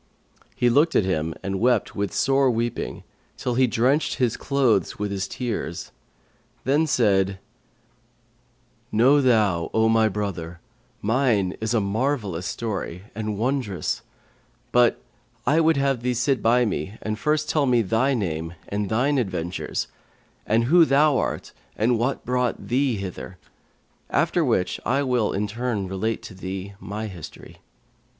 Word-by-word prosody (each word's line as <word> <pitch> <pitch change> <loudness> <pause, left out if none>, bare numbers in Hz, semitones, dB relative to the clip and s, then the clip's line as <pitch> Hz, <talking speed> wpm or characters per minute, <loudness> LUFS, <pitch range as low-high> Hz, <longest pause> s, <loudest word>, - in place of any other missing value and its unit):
He 125 - +2
looked 145 +7 +3
at 100 - +4
him 80 -3 -1
and 95 -1 -2
wept 120 -2 +2
with 100 -1 -1
sore 135 0 +3
weeping, 115 -1 -2 0.3
till 125 - -2
he 130 +1 +3
drenched 130 +6 +1
his 125 -4 +1
clothes 130 - +1
with 105 -1 -3
his 95 -1 -2
tears; 115 -9 -4 0.7
then 150 +4 +2
said, 100 -7 +2 1.5
'Know 130 +7 +5
thou, 105 -10 +2
O 110 0 +4
my 110 -1 +4
brother, 90 -5 -4 0.4
mine 110 -5 +2
is 110 +2 0
a - - +4
marvellous 100 - -1
story 100 -5 -4
and 110 +1 -4
a - - 0
wondrous; 115 -3 -1 0.7
but 120 -1 +4 0.5
I 155 +3 +3
would 160 -2 +3
have 135 -3 +1
thee 125 0 0
sit 125 0 +1
by 120 +2 +4
me 95 0 -3
and 110 0 -3
first 150 +5 +1
tell 150 -3 +1
me 120 -2 +3
thy 120 +7 +1
name 85 -5 -3
and 100 -1 -2
thine 130 +5 +2
adventures 95 -6 -3 0.6
and 115 +2 +3
who 165 +8 +6
thou 145 -1 +4
art - - -3 0.3
and 115 +2 +2
what 125 +4 -1
brought 125 -1 -1
thee 130 0 +2
hither; 90 -1 -7 0.7
after - - +2
which 90 - 0
I 135 +3 +1
will, 125 -5 +1
in 105 +2 -1
turn, 110 -2 -2
relate 105 +4 -2
to - - -9
thee 95 +1 -6
my 105 +2 -5
history.' 90 -7 -10
115 Hz, 145 wpm, -24 LUFS, 100-130 Hz, 1.5 s, who